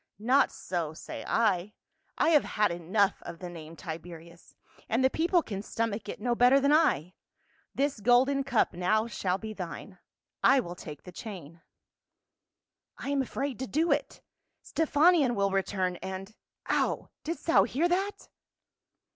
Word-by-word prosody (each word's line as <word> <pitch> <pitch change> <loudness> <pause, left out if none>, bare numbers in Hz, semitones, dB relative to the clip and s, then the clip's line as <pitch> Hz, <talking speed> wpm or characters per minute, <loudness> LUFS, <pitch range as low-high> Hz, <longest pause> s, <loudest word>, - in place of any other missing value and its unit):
Not 250 +7 +3
so, 165 -4 -4
say - - -7
I. 210 -3 +1 0.4
I - - +3
have 305 -3 +5
had 210 -3 +1
enough 190 +4 +1
of 170 - -8
the 180 0 -7
name 165 -1 -10
Tiberius, 170 +1 -10 0.3
and 235 +4 +1
the 260 - +4
people 340 +1 +2
can 200 -3 -5
stomach 220 -1 -3
it - - -6
no 240 +3 0
better 250 +3 +5
than 280 +2 +3
I. 180 - +2 0.6
This 280 -2 0
golden 255 +5 +3
cup 255 -8 +1
now 185 +5 +1
shall 190 -4 -1
be 220 +1 -7
thine. 185 0 -8 0.4
I 270 - +6
will 175 -8 -4
take 150 -4 -10
the 180 - -10
chain." 170 -5 -9 0.7
" - - -61
I - - -6
am 280 -1 +1
afraid 265 -1 -3
to 260 - -3
do 320 +6 +1
it; - - -1 0.4
Stephanion 310 -4 +3
will 200 -1 +1
return, 190 -2 -1
and 190 +3 -7 0.2
— - - -62
Ow! - - 0
Didst 330 +2 -5
thou 330 - +5
hear 315 +7 +1
that 385 +3 -2
215 Hz, 160 wpm, -29 LUFS, 180-275 Hz, 0.7 s, I